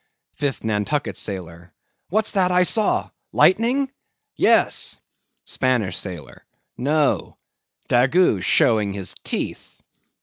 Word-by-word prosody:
5TH 140 Hz, -6 st, -2 dB
NANTUCKET 110 Hz, +7 st, -1 dB
SAILOR. 85 Hz, -3 st, -5 dB, 0.4 s
What's 215 Hz, +3 st, 0 dB
that 185 Hz, -3 st, +2 dB
I 180 Hz, 0 st, +4 dB
saw—lightning? 230 Hz, +5 st, +1 dB, 0.4 s
Yes. -, -, +2 dB, 0.5 s
SPANISH 125 Hz, -7 st, 0 dB
SAILOR. 90 Hz, -6 st, -6 dB, 0.3 s
No; 145 Hz, +3 st, 0 dB, 0.5 s
Daggoo 130 Hz, -, +3 dB
showing 105 Hz, -1 st, +2 dB
his 95 Hz, -2 st, -4 dB
teeth. -, -, -5 dB
130 Hz, 90 wpm, -22 LUFS, -, 0.5 s, I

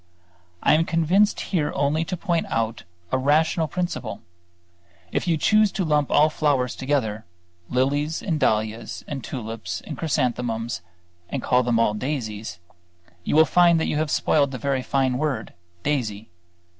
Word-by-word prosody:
I -, -, +5 dB
am 160 Hz, +2 st, +4 dB
convinced 170 Hz, +5 st, +2 dB
here 160 Hz, -6 st, -1 dB
only 145 Hz, +3 st, +1 dB
to 180 Hz, -, -4 dB
point 170 Hz, -2 st, -1 dB
out 115 Hz, 0 st, -2 dB, 0.3 s
a 130 Hz, -, +2 dB
rational 155 Hz, +4 st, +2 dB
principle. 155 Hz, -, -4 dB, 0.9 s
If -, -, -1 dB
you 165 Hz, -2 st, +2 dB
choose 215 Hz, +5 st, +4 dB
to 190 Hz, -, -1 dB
lump 150 Hz, -2 st, +2 dB
all 150 Hz, +1 st, +5 dB
flowers 140 Hz, -5 st, +1 dB
together, 130 Hz, -6 st, -1 dB, 0.5 s
lilies 145 Hz, +5 st, 0 dB
and 160 Hz, -5 st, -1 dB
dahlias 110 Hz, -2 st, -1 dB
and 135 Hz, -4 st, -5 dB
tulips 110 Hz, -8 st, -5 dB
and -, -, -7 dB
chrysanthemums 120 Hz, -, -1 dB, 0.5 s
and 135 Hz, -, -3 dB
call 125 Hz, 0 st, +3 dB
them 120 Hz, -2 st, +1 dB
all 105 Hz, -2 st, +3 dB
daisies, 110 Hz, -, -4 dB, 0.7 s
you -, -, -1 dB
will 160 Hz, +1 st, +7 dB
find 170 Hz, +2 st, +4 dB
that -, -, 0 dB
you -, -, -1 dB
have 155 Hz, 0 st, 0 dB
spoiled 145 Hz, -1 st, +2 dB
the 130 Hz, -, -5 dB
very 135 Hz, +1 st, -1 dB
fine 130 Hz, -1 st, 0 dB
word 140 Hz, -7 st, -2 dB, 0.3 s
daisy. 110 Hz, -9 st, -2 dB
140 Hz, 155 wpm, -24 LUFS, 115-155 Hz, 0.9 s, will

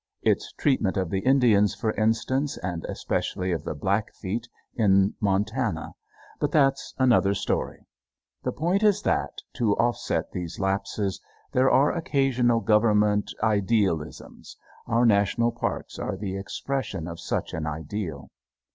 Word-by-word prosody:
Its -, -, +1 dB
treatment 120 Hz, -10 st, +1 dB
of 95 Hz, -3 st, -1 dB
the 95 Hz, -, 0 dB
Indians, 115 Hz, -5 st, +4 dB
for 110 Hz, -, -1 dB
instance, 115 Hz, +6 st, 0 dB
and 90 Hz, -2 st, -3 dB
especially 90 Hz, 0 st, -2 dB
of 80 Hz, -4 st, -2 dB
the -, -, -4 dB
Blackfeet, 100 Hz, +5 st, -2 dB, 0.3 s
in 100 Hz, -3 st, +3 dB
Montana. 100 Hz, -2 st, -1 dB, 0.5 s
But 145 Hz, -, 0 dB
that's 135 Hz, -3 st, +2 dB
another 120 Hz, -6 st, +3 dB
story. -, -, -2 dB, 0.6 s
The -, -, -2 dB
point 175 Hz, +6 st, 0 dB
is 210 Hz, -1 st, +3 dB
that, -, -, +1 dB, 0.3 s
to 110 Hz, -5 st, +2 dB
offset 120 Hz, 0 st, 0 dB
these 85 Hz, -2 st, -5 dB
lapses, 95 Hz, 0 st, -1 dB, 0.3 s
there 130 Hz, +1 st, +3 dB
are 140 Hz, +3 st, +4 dB
occasional 130 Hz, -7 st, +1 dB
Government 105 Hz, -2 st, +3 dB
idealisms. 100 Hz, -7 st, -1 dB, 0.3 s
Our 120 Hz, 0 st, +3 dB
National 115 Hz, +2 st, +3 dB
Parks 120 Hz, -, -4 dB
are 95 Hz, -, -3 dB
the 95 Hz, -1 st, -4 dB
expression 100 Hz, -2 st, -4 dB
of 85 Hz, -1 st, -7 dB
such 85 Hz, -, -3 dB
an 80 Hz, -1 st, -3 dB
ideal. 80 Hz, 0 st, -5 dB
105 Hz, 130 wpm, -26 LUFS, 95-125 Hz, 0.6 s, Indians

